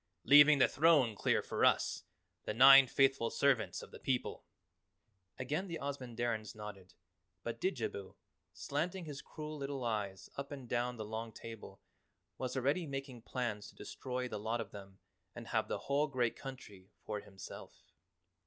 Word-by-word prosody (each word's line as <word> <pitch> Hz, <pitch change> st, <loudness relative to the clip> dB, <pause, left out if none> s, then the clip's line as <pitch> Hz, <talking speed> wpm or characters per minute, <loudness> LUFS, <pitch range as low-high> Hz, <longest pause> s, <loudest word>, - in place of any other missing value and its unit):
"Leaving 145 Hz, +1 st, +8 dB
the 130 Hz, -, +6 dB
throne 145 Hz, -6 st, +4 dB
clear -, -, +1 dB
for -, -, -2 dB
us -, -, +3 dB, 0.4 s
the 105 Hz, -, -3 dB
Nine 135 Hz, +2 st, +10 dB
Faithful 135 Hz, -2 st, +3 dB
Servants 140 Hz, -5 st, +1 dB
of -, -, -12 dB
the -, -, -11 dB
People!" 130 Hz, -2 st, -2 dB, 0.9 s
Again 150 Hz, +9 st, -2 dB
the 170 Hz, -2 st, -4 dB
Ozamandarins 120 Hz, -6 st, -3 dB
nodded, 105 Hz, -3 st, -9 dB, 0.5 s
but -, -, -5 dB
Didjabo, 100 Hz, -1 st, -3 dB, 0.4 s
slanting 170 Hz, +5 st, -3 dB
his 145 Hz, -3 st, -7 dB
cruel 155 Hz, -1 st, -7 dB
little 140 Hz, -2 st, -4 dB
eyes 105 Hz, -4 st, -3 dB
up 140 Hz, +1 st, -5 dB
and 135 Hz, -4 st, -7 dB
down 120 Hz, +1 st, -1 dB
the 110 Hz, -, -5 dB
long 110 Hz, +1 st, -5 dB
table, 110 Hz, -4 st, -10 dB, 0.6 s
was 130 Hz, 0 st, -3 dB
already 140 Hz, +6 st, +1 dB
making 135 Hz, -3 st, -6 dB
plans 115 Hz, -4 st, -3 dB
to -, -, -15 dB
destroy 125 Hz, -1 st, -4 dB
the 105 Hz, -4 st, -5 dB
lot 110 Hz, +3 st, -2 dB
of 115 Hz, -, -5 dB
them 95 Hz, -1 st, -11 dB, 0.4 s
and -, -, -8 dB
have -, -, 0 dB
the -, -, -2 dB
whole 145 Hz, +2 st, +1 dB
great 125 Hz, -5 st, 0 dB
country 105 Hz, -8 st, -10 dB
for 105 Hz, -1 st, -3 dB
himself. 100 Hz, -2 st, -11 dB
125 Hz, 155 wpm, -35 LUFS, 110-140 Hz, 0.9 s, Nine